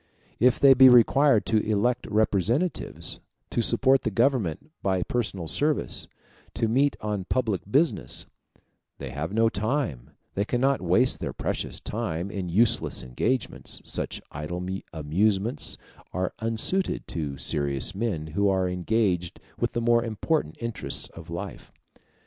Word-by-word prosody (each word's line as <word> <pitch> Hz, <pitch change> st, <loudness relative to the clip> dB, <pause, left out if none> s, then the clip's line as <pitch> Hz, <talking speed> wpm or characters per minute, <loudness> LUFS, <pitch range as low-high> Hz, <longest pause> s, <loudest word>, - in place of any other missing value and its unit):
If 125 Hz, +2 st, +4 dB
they 140 Hz, -1 st, +8 dB
be 130 Hz, 0 st, +8 dB
required 125 Hz, 0 st, +5 dB
to 110 Hz, -, +2 dB
elect 110 Hz, +3 st, 0 dB
representatives, 110 Hz, -, 0 dB, 0.3 s
to -, -, +1 dB
support 135 Hz, +3 st, +3 dB
the -, -, -1 dB
Government 120 Hz, -, 0 dB
by 95 Hz, -2 st, +1 dB
personal 100 Hz, -8 st, -2 dB
service, 150 Hz, -, 0 dB, 0.5 s
to 115 Hz, -, +1 dB
meet 135 Hz, +5 st, +2 dB
on 105 Hz, -3 st, -2 dB
public 110 Hz, -5 st, 0 dB
business, 150 Hz, +8 st, +1 dB, 0.7 s
they 70 Hz, -3 st, -6 dB
have 75 Hz, +6 st, -4 dB
no 115 Hz, +2 st, +3 dB
time 110 Hz, -, -2 dB, 0.2 s
they 100 Hz, -, 0 dB
cannot 130 Hz, +5 st, +1 dB
waste 95 Hz, +9 st, +3 dB
their -, -, -4 dB
precious -, -, -3 dB
time 100 Hz, -5 st, -3 dB
in 95 Hz, -4 st, -4 dB
useless 110 Hz, +7 st, +2 dB
engagements: 110 Hz, -, -2 dB
such -, -, -4 dB
idle 85 Hz, +5 st, -5 dB, 0.3 s
amusements 100 Hz, -, 0 dB, 0.4 s
are 90 Hz, 0 st, -1 dB
unsuited 115 Hz, +12 st, 0 dB
to 75 Hz, -4 st, -3 dB
serious 70 Hz, 0 st, 0 dB
men 100 Hz, -7 st, -2 dB
who 100 Hz, +3 st, +2 dB
are 95 Hz, -1 st, +1 dB
engaged 90 Hz, -1 st, 0 dB, 0.2 s
with -, -, -1 dB
the 120 Hz, -, -1 dB
more 120 Hz, 0 st, +3 dB
important 115 Hz, -, -1 dB
interests 115 Hz, -2 st, -4 dB
of 85 Hz, 0 st, -12 dB
life. 85 Hz, +1 st, -7 dB
110 Hz, 135 wpm, -26 LUFS, 90-125 Hz, 0.7 s, they